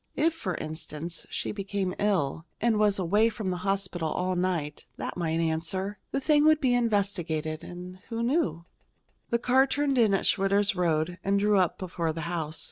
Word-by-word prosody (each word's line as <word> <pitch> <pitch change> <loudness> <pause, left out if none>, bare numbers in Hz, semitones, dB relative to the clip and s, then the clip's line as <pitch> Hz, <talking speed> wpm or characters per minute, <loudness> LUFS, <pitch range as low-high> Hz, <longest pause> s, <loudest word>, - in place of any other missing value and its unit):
If, 325 +1 +2
for 190 - -3
instance, 155 +1 -5
she - - -3
became 195 -2 -2
ill, 170 -6 0
and 225 -2 +2
was 210 -2 +3
away 205 +5 +3
from 210 -4 -3
the 180 - -2
hospital 185 -3 -1
all 185 +3 -1
night, 175 -5 -2
that - - -4
might 165 -2 -1
answer. 170 +5 -2
The 275 - -1
thing 295 +1 +4
would 310 -1 +6
be 260 -5 +2
investigated, 190 -9 0
and 180 +1 -9
who 230 0 -2
knew 235 - 0 0.6
The 235 - +2
car 260 +3 +4
turned 275 -1 +1
in 215 -4 +5
at - - -1
Schwitter's 200 +1 +3
road 175 0 0
and 200 +1 +2
drew 205 0 +3
up 180 -3 +1
before 170 -3 -2
the 165 - -4
house. 160 -2 -3
190 Hz, 180 wpm, -28 LUFS, 170-215 Hz, 0.6 s, would